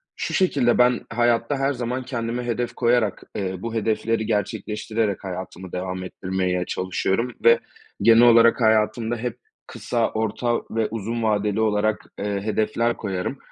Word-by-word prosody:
Şu - - -4
şekilde, 140 - +2
ben 125 0 +4
hayatta 120 +3 +1
her 135 +1 +1
zaman 125 +1 -3
kendime 120 -1 -3
hedef 120 0 -2
koyarak, 120 -4 +1
eee, 95 -2 -2
bu 115 0 -4
hedefleri 110 0 0
gerçekleştirerek 105 0 -2
hayatımı 95 -1 -7
devam 90 0 -4
ettirmeye 90 -1 -2
çalışıyorum 95 +6 -1
ve 470 +1 +6 0.4
genel 115 0 +6
olarak 115 0 +6
hayatımda 110 +1 +2
hep 120 0 -4 0.3
kısa, 115 -2 -1
orta 110 +2 0
ve 110 -1 0
uzun 115 +1 -3
vadeli 105 0 +1
olarak, 110 0 +1
eee, 100 -1 -2
hedefler 110 +2 0
koyarım. 95 +6 -3
110 Hz, 140 wpm, -23 LUFS, 105-120 Hz, 0.4 s, ve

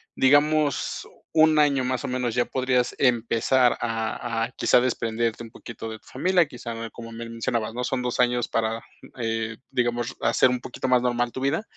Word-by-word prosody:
digamos, 145 +1 +2 0.3
1 155 -1 +5
año, 140 -3 +3
más 130 0 -2
o - - -3
menos 125 -2 -2
ya 120 -1 +2
podrías 125 -1 0
empezar 120 0 +3
a 115 0 -2
a 120 - -10
quizá - - +4
desprenderte 115 -2 -1
un 115 - -10
poquito 115 -1 -8
de 110 - -6
tu - - -31
familia, 180 +6 +2
quizá, 115 -3 -6
como 115 -1 -10
me 115 +1 -7
mencionabas, 115 -1 -2
¿no? 125 +1 -3
Son 125 +1 -1
2 125 -1 -2
años 120 -1 +2
para, 115 0 -1 0.4
eh, 115 -1 -2
digamos, 120 -1 -1
hacer 130 - +4
un 125 - -1
poquito 130 +1 -5
más 125 -1 +4
normal 120 -1 0
tu 130 - -6
vida, 140 +9 0
120 Hz, 185 wpm, -25 LUFS, 115-130 Hz, 0.4 s, 1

